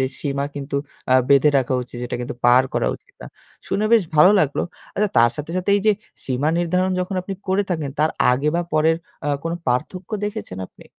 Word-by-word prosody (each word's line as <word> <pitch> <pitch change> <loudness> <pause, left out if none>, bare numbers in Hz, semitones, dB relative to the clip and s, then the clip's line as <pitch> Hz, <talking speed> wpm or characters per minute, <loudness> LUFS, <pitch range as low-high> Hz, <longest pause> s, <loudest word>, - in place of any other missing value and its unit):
যে - - +3 0.2
সীমা 140 -1 -1
কিন্তু 140 0 -4 0.4
আ - - +6
বেঁধে 140 +1 +5
রাখা 130 0 -1
উচিত। 125 0 -11
যেটা 120 - -3
কিন্তু 120 - -5
পার 125 +1 +6
করা - - +1
উচিত - - -17
না। - - -8 0.4
শুনে 210 - 0
বেশ 230 -3 +6
ভালো 155 +6 +7
লাগলো। 145 -4 0 0.3
আচ্ছা 210 +1 +1
তার 120 0 +5
সাথে, 150 +1 -6
সাথে 185 +2 -1
এই 205 - 0
যে 215 - +6 0.3
সীমা 130 +3 0
নির্ধারণ 180 +2 +1
যখন 180 +2 -3
আপনি 195 +1 -5
করে 190 +2 +2
থাকেন 155 -5 -2
তার 155 +1 +3 0.2
আগে 135 +4 0
বা 175 - +1
পরের 160 +1 +3 0.3
অ্যা 145 -1 0
কোন 165 - -2
পার্থক্য 155 - -2
দেখেছেন 100 - -5
আপনি? - - -18
150 Hz, 210 wpm, -21 LUFS, 135-185 Hz, 0.4 s, ভালো